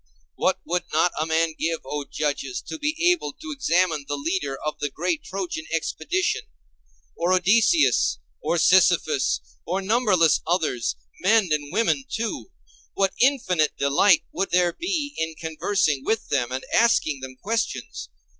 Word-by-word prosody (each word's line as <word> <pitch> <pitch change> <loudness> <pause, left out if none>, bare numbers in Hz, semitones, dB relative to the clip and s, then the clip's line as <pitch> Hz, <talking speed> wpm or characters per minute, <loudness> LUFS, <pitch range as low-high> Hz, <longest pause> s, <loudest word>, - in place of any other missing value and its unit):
What - - 0
would 180 +1 -1
not 165 +3 +3
a 155 - 0
man 160 0 +1
give, 165 0 -1
O 145 +2 -4
judges, 140 -4 -2
to 320 - -7
be 300 +1 -1
able 235 - -2
to 315 0 -9
examine 180 - +1
the 145 - -2
leader 145 -2 -2
of 150 - -3
the 145 - -1
great 170 +3 -2
Trojan 180 -4 -5
expedition; 365 - -1 0.7
or 170 +2 0
Odysseus 170 - +3 0.2
or 170 - 0
Sisyphus, 165 - +3 0.2
or 185 +3 -2
numberless 195 - +3
others, 150 - 0 0.2
men 210 0 +3
and 145 -1 -1
women 230 +4 +1
too! 230 +10 -4 0.5
What 195 -1 +1
infinite 190 - +2
delight 145 +6 +4
would 195 +1 -2
there 175 -1 +2
be 325 -6 -2
in 160 0 -2
conversing 160 -2 -1
with 220 +6 -1
them 125 -3 0
and 130 +1 -4
asking 155 -11 +3
them 130 0 -8
questions! 225 - -3
170 Hz, 145 wpm, -24 LUFS, 150-215 Hz, 0.7 s, delight